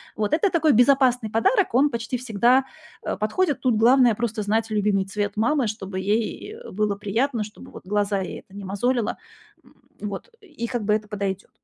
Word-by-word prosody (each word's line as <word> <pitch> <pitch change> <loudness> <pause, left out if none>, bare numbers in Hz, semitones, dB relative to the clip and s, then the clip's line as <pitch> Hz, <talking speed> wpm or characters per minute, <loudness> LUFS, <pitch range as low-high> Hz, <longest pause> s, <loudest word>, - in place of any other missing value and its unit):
Вот. 210 -1 -1
Это 335 +5 +3
такой 320 -3 +3
безопасный 250 -2 +4
подарок, 365 - +2
он 280 +4 +5
почти 235 -1 -3
всегда, 245 +2 +2 0.4
э, - - -2
подходит. 285 - 0
Тут 250 -3 +2
главное- 245 +1 +5
просто 225 -1 -2
знать 220 +2 0
любимый 205 -2 +1
цвет 205 +1 -3
мамы, 245 +2 +2
чтобы 195 -3 -5
ей, 215 - -2
э, 480 - -11
было 210 +1 0
приятно, 225 +4 -1
чтобы 210 - -12
вот - - -12
глаза 205 0 0
ей 185 - -5
это 195 - -19
не 200 - -7
мозолило, 205 +7 0 0.7
м, - - -22 0.3
вот. 210 - -6
И 300 - -6
как 240 -3 -3
бы 210 - +2
это 215 0 -1
подойдёт. 200 -2 -4
220 Hz, 185 wpm, -24 LUFS, 205-255 Hz, 0.7 s, он